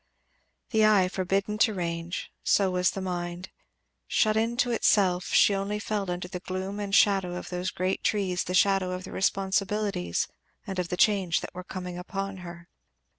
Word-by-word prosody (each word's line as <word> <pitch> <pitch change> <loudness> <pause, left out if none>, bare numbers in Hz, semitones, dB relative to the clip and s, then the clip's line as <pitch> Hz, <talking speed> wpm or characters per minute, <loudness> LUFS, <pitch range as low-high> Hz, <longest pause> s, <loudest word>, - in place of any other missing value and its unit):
The 220 -1 +3
eye 205 -4 +5
forbidden 195 +3 -1
to 220 -2 +3
range, 170 -1 -4
so 195 -2 +3
was 180 0 +2
the 195 - -5
mind, 175 0 -4 0.6
shut 215 -1 +2
in 230 +2 0
to 245 -2 +2
itself; 190 -5 +2
and - - +3
she 205 - +6
only 200 +1 -1
felt 205 -2 -2
under 180 0 -3
the 180 0 -6
gloom 190 +2 -4
and 200 -1 -1
shadow 195 -5 +3
of 180 - -6
those 180 +1 -2
great 185 +1 -2
trees 190 -4 0
the 180 - -2
shadow 195 -2 +3
of 180 0 -5
the 190 - -9
responsibilities 195 - 0 0.4
and 190 -1 -4
of 180 - -1
the 180 - -2
change 190 -6 +3
that - - -7
were 180 +1 -7
coming 180 -1 -6
upon 195 +1 -4
her. 170 -1 -10
190 Hz, 180 wpm, -27 LUFS, 180-200 Hz, 0.6 s, she